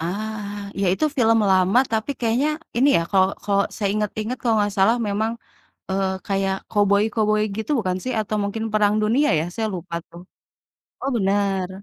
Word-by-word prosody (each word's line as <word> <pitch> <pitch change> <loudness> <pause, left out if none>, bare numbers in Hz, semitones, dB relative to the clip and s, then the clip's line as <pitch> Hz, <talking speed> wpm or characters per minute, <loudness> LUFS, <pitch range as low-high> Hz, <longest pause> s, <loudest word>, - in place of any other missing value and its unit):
Ah, 205 +2 -5
iya 195 - 0
itu 195 - 0
film 225 -2 +4
lama 190 +5 +4
tapi 220 +5 -1
kayaknya 240 +6 +1 0.3
ini 270 +4 +4
ya - - +3
kalau 190 -1 +4 0.2
kalau 200 -1 +2
saya 205 -2 -1
inget-inget 215 +3 -2
kalau 230 -2 +1
enggak 205 -1 +1
salah 220 +5 +4
memang, 220 +3 0 0.6
eee, 195 0 0 0.2
kayak 195 -1 0
koboi-koboi 210 +1 +2 0.2
gitu 220 +7 -3
bukan 185 -4 -1
sih? 255 - -2
Atau 215 0 -2
mungkin 210 +2 -3
perang 210 -1 +3
dunia 245 +8 +2
ya? - - 0
Saya 220 -1 -1
lupa 170 -1 -6
tuh. 170 +1 -12 0.8
Oh 275 - -2
benar? 195 -2 0
205 Hz, 170 wpm, -22 LUFS, 195-220 Hz, 0.8 s, film